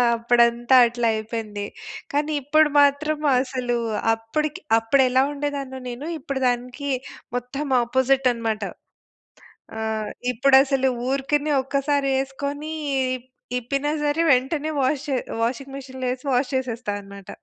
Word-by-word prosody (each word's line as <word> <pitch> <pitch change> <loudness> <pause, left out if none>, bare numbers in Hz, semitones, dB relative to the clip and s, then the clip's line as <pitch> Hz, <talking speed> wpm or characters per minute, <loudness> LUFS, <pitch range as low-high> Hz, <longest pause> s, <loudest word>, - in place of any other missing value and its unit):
అప్పుడంతా 235 +1 +3
అట్లా 240 0 -1
అయిపోయింది. 215 -2 -4 0.5
కానీ 295 +2 0
ఇప్పుడు 305 +3 +4
మాత్రం 295 +2 +2 0.2
అసలు 255 -2 -2 0.4
అప్పడికి 300 - -3 0.2
అప్పుడు 225 +5 +3
ఎలా 260 +1 +4
ఉండేదాన్నో 280 -2 -4
నేను. 245 +5 -6
ఇప్పుడు 275 -2 -4
దానికి 250 +3 -2 0.5
మొత్తం 250 +4 -3 0.2
అపోజిట్ 260 +2 +2
అనమాట. 225 -2 -2 1.2
ఆహ్, 220 -1 -2 0.2
ఇప్పుడు 265 +3 +4
అసలు 270 -1 +1 0.2
ఊరికనే 285 +2 0
ఒక్కసారి 275 +1 0
ఏసుకొని 280 +3 -5 0.5
ఇప్ 250 - -20 0.3
ఇప్పిన 275 +4 -2 0.2
సరే, 295 +2 +1
వెంటనే 285 +4 +1
వాష్ 265 +2 +1
చె - - 0 0.3
వాషింగ్ 265 +3 -3
మెషిన్‌లో 260 -1 -7
వేసి 255 +2 -4
వాష్ 250 +1 +1
చేసేస్తా 245 -4 -2
అనమాట. 200 -1 -12
260 Hz, 120 wpm, -23 LUFS, 240-285 Hz, 1.2 s, ఇప్పుడు